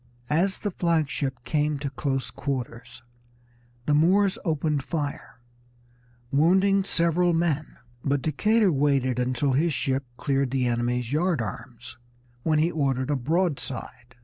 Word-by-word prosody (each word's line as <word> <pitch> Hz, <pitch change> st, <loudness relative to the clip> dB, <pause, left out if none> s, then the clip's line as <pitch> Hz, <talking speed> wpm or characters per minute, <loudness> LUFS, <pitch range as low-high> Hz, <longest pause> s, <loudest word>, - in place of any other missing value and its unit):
As 185 Hz, +5 st, +2 dB
the 205 Hz, -, -3 dB
flag 165 Hz, -4 st, +1 dB
ship 130 Hz, -2 st, -3 dB
came 150 Hz, 0 st, 0 dB
to 140 Hz, -1 st, -4 dB
close 135 Hz, -1 st, -2 dB
quarters 125 Hz, -4 st, -5 dB, 0.8 s
the 150 Hz, -, +2 dB
Moors 190 Hz, +6 st, +3 dB
opened 155 Hz, -4 st, 0 dB
fire, 145 Hz, -4 st, -4 dB, 0.9 s
wounding 190 Hz, +7 st, +4 dB
several 175 Hz, -1 st, +2 dB
men, 165 Hz, -3 st, -1 dB, 0.3 s
but 140 Hz, -2 st, 0 dB
Decatur 210 Hz, +7 st, +2 dB
waited 135 Hz, -4 st, +1 dB
until 130 Hz, +2 st, 0 dB
his 155 Hz, +2 st, +1 dB
ship 135 Hz, +1 st, 0 dB
cleared 135 Hz, -2 st, 0 dB
the 130 Hz, 0 st, 0 dB
enemy's 120 Hz, +1 st, -1 dB
yard 170 Hz, 0 st, +1 dB
arms, 115 Hz, +3 st, -7 dB, 0.4 s
when 155 Hz, +3 st, +1 dB
he 160 Hz, +3 st, +2 dB
ordered 135 Hz, -3 st, 0 dB
a -, -, +2 dB
broadside. 135 Hz, -4 st, -2 dB
145 Hz, 130 wpm, -26 LUFS, 130-165 Hz, 0.9 s, wounding